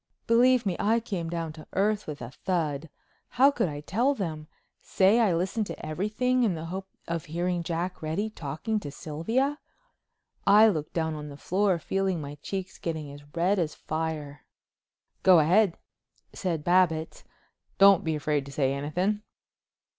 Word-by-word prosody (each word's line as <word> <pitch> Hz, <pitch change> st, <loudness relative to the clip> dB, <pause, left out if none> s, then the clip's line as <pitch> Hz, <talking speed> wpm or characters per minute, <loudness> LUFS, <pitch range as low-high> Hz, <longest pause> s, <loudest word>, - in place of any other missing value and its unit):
Believe 245 Hz, +1 st, +4 dB
me 185 Hz, -3 st, 0 dB
I 225 Hz, +3 st, +3 dB
came 190 Hz, -8 st, -4 dB
down 165 Hz, -2 st, -3 dB
to 155 Hz, -1 st, -12 dB
earth 210 Hz, +2 st, +1 dB
with 145 Hz, -4 st, -6 dB
a 120 Hz, -, -7 dB
thud. 160 Hz, -3 st, -2 dB, 0.5 s
How 270 Hz, +3 st, +7 dB
could 195 Hz, -, 0 dB
I 145 Hz, -1 st, -6 dB
tell 240 Hz, -, +1 dB
them? 155 Hz, -8 st, -4 dB, 0.3 s
Say 200 Hz, +5 st, +3 dB
I 205 Hz, -7 st, +3 dB
listened 190 Hz, +5 st, -1 dB
to -, -, -7 dB
everything 215 Hz, +10 st, 0 dB
in 210 Hz, -7 st, +2 dB
the 160 Hz, 0 st, -6 dB
hope 190 Hz, +3 st, -5 dB, 0.2 s
of 170 Hz, -1 st, -3 dB
hearing 175 Hz, +2 st, -1 dB
Jack 170 Hz, +2 st, -3 dB
Reddy 160 Hz, +7 st, -1 dB
talking 160 Hz, +6 st, -3 dB
to 145 Hz, -, -7 dB
Sylvia. 225 Hz, -, -1 dB, 0.9 s
I 210 Hz, +2 st, +8 dB
looked 155 Hz, -6 st, -3 dB
down 160 Hz, -1 st, -1 dB
on 150 Hz, -1 st, -6 dB
the 140 Hz, -, -10 dB
floor, 190 Hz, +3 st, +1 dB
feeling 190 Hz, +1 st, -1 dB
my 145 Hz, -1 st, -6 dB
cheeks 190 Hz, +1 st, -5 dB
getting 160 Hz, -4 st, -4 dB
as 145 Hz, +1 st, -11 dB
red 185 Hz, +4 st, +2 dB
as 160 Hz, -3 st, -1 dB
fire. 155 Hz, -3 st, -4 dB, 0.8 s
"Go 185 Hz, -2 st, +7 dB
ahead," 175 Hz, +4 st, +4 dB, 0.6 s
said 170 Hz, -5 st, -2 dB
Babbitts. 170 Hz, -2 st, +2 dB, 0.5 s
"Don't 195 Hz, -2 st, +7 dB
be 160 Hz, -1 st, 0 dB
afraid 150 Hz, -1 st, 0 dB
to -, -, -8 dB
say 135 Hz, -1 st, +1 dB
anything." 180 Hz, +9 st, -1 dB
175 Hz, 160 wpm, -27 LUFS, 155-205 Hz, 0.9 s, I